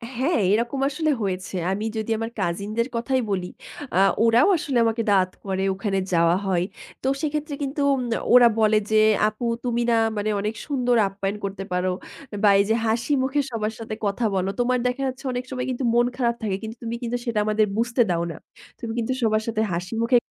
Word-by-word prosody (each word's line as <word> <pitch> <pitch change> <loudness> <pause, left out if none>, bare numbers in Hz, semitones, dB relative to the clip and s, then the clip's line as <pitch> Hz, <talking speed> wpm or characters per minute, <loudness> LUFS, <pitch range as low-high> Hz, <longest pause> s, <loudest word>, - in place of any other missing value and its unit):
হ্যাঁ, 265 +4 +1
এরকম 235 +5 0
আসলে 305 +2 0
হয়েছে। 185 -1 -3 0.2
আমি 210 +3 -2
যদি 220 +1 -2
আমার 225 +1 -4
কাজিনদের 205 +6 -1
কথাই 255 +3 0
বলি, 185 -2 -1 0.5
আ - - +2 0.3
ওরাও 230 +9 +5
আসলে 280 -5 -2
আমাকে 225 +1 0
দাওয়াত 185 -2 +3
করে, 190 -1 -1
ওখানে 195 0 -1
যাওয়া 170 0 +4
হয়। 175 -2 +1 0.4
তো - - -2
সেক্ষেত্রে 300 -1 -2
কিন্তু 280 +1 -3
উম 265 - 0 0.3
ওরা 245 -1 +9
বলে 215 0 +4
যে, - - +3 0.3
"আপু 215 +3 -5 0.2
তুমি 240 -1 0
না 235 - +4 0.2
মানে 205 +1 -1
অনেক 210 +2 -2
সুন্দর 250 -4 +1
আপ্যায়ন 195 +1 -3
করতে 195 0 -5
পারো 180 +1 0 0.5
বা, 205 - +7
এইযে 210 +3 +2
হাসি 235 +5 0
মুখে 270 +2 0
সবার 220 -1 -2
সাথে 220 -1 -5
কথা 200 +4 -1
বলো। 190 +1 0
তোমার 250 +1 +2
দেখা 250 +2 -2
যাচ্ছে 260 +2 -6
অনেক 250 0 -3
সময় 255 -1 -3
কিন্তু 255 +1 -3
মন 240 0 +4
খারাপ 235 -2 +1
থাকে। 200 -3 0
কিন্তু 220 +1 -6
তুমি 230 0 -3
কিন্তু 240 +1 -1
সেটা 230 -3 0
আমাদের 215 0 +2
বুঝতে 235 +2 +1
দাও 170 -1 +1
না। 160 - -8 0.4
তুমি 230 - -5
কিন্তু 235 +2 0
সবার 215 -1 +2
সাথে 220 -1 0
হাসি 180 +5 -4
মুখে" 245 +1 +4
225 Hz, 195 wpm, -24 LUFS, 200-245 Hz, 0.5 s, ওরা